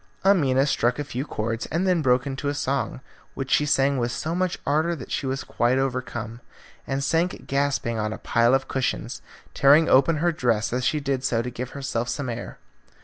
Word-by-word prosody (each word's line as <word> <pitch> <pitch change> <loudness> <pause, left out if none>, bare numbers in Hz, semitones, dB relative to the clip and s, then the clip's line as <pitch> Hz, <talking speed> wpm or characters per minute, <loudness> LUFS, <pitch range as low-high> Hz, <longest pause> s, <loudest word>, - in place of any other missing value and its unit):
Amina 140 -9 +4
struck 120 -4 +1
a 145 - -2
few 130 0 -4
chords 115 -3 -3
and 170 +4 -1
then 180 -3 +2
broke 125 -2 +2
into 140 +1 -4
a 145 - -2
song, 135 -2 -2 0.3
which 135 -1 -5
she 150 - +3
sang 135 -1 +2
with 120 0 -1
so 160 +5 -3
much 185 0 -1
ardour 160 +4 +1
that 135 - -10
she 135 - -2
was 135 +1 -2
quite 120 +2 +1
overcome, 125 -3 -3 0.5
and 135 +1 -1
sank 165 +6 0
gasping 140 -5 0
on 110 0 -1
a - - -5
pile 120 +2 +3
of 135 0 -1
cushions, 130 -1 -2 0.3
tearing 145 +4 +5
open 135 +5 +4
her 170 +3 +2
dress 120 -8 0
as 125 +1 -1
she 150 +4 +1
did 135 -2 -2
so 115 -3 +1
to 125 - -5
give 125 +1 -5
herself 120 -4 -2
some 140 -3 -3
air. 120 0 -6
135 Hz, 205 wpm, -24 LUFS, 125-145 Hz, 0.5 s, tearing